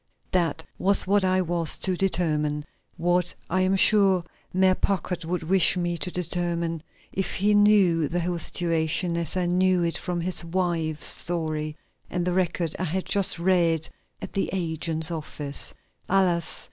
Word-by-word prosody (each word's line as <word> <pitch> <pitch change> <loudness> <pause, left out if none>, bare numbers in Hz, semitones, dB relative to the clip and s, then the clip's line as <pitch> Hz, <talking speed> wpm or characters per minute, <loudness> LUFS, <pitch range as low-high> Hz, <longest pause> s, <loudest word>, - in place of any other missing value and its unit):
That 165 -4 0
was 200 +1 +5
what 200 +1 +2
I 185 0 +2
was 170 -2 +1
to 185 - +1
determine; 150 -5 0 0.3
what 175 +1 0 0.2
I 185 +1 +2
am 185 +1 +2
sure 195 -2 +4 0.3
Mayor 185 0 +3
Packard 185 -2 -2
would 175 0 -3
wish 185 +2 +4
me 175 -1 -1
to - - -3
determine 170 -2 -2 0.3
if 190 -1 -2
he 205 +2 +2
knew 200 -6 +4
the 175 +3 -2
whole 175 0 -2
situation 165 +1 -1
as 170 +1 -2
I 180 - 0
knew 180 0 +2
it 170 -1 -1
from 175 -1 -3
his 175 0 -1
wife's 165 -3 -1
story 155 -3 -2 0.3
and 175 -1 -2
the 180 - 0
record 175 -3 -1
I 185 - -1
had 185 +3 -2
just 200 -3 +2
read 170 -3 +1 0.4
at - - -7
the 195 - -1
agent's 160 -2 -2
office. 150 -3 -3 0.4
Alas! 180 -3 +1
175 Hz, 160 wpm, -25 LUFS, 165-185 Hz, 0.4 s, was